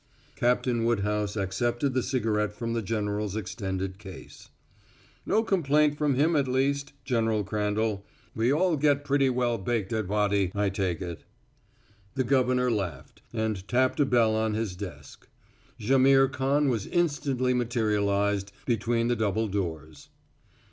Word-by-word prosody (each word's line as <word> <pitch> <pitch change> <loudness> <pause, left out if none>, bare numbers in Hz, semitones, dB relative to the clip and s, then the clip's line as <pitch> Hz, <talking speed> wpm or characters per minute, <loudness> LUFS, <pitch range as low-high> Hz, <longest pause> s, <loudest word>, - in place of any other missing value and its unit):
Captain 120 -1 +1
Woodhouse 105 -2 0
accepted 120 +7 -1
the 130 - +1
cigarette 110 -5 0
from 115 +2 -4
the 115 - -1
general's 105 -1 -2
extended 95 -2 -4
case. 95 -4 -12 0.8
"No 220 - +2
complaint 150 -7 +2
from 145 -2 +1
him 155 +5 +2
at 140 -3 +2
least, 140 +2 0
General 115 -4 +1
Crandall. 105 0 -1 0.3
We 115 +3 +1
all 165 +2 +2
get 145 0 +2
pretty 140 -1 +2
well 120 -2 0
baked 110 +1 -2
at 110 -3 -1
Wady, 100 -2 +1
I 100 -1 +1
take 95 -3 -2
it." 85 -2 -7 0.9
The 130 - +1
governor 125 -1 +2
laughed, 90 - -4
and 110 -4 -2
tapped 130 +2 +1
a 145 - +5
bell 115 -4 +3
on 110 -1 0
his 110 -4 -2
desk. 95 -2 -9 0.5
Jaimihr 135 +3 +4
Khan 140 +2 +1
was 115 -6 -1
instantly 140 -7 0
materialized 105 -4 0
between 115 0 0
the 120 - +1
double 110 0 0
doors. 80 -7 -5
115 Hz, 140 wpm, -27 LUFS, 100-130 Hz, 0.9 s, a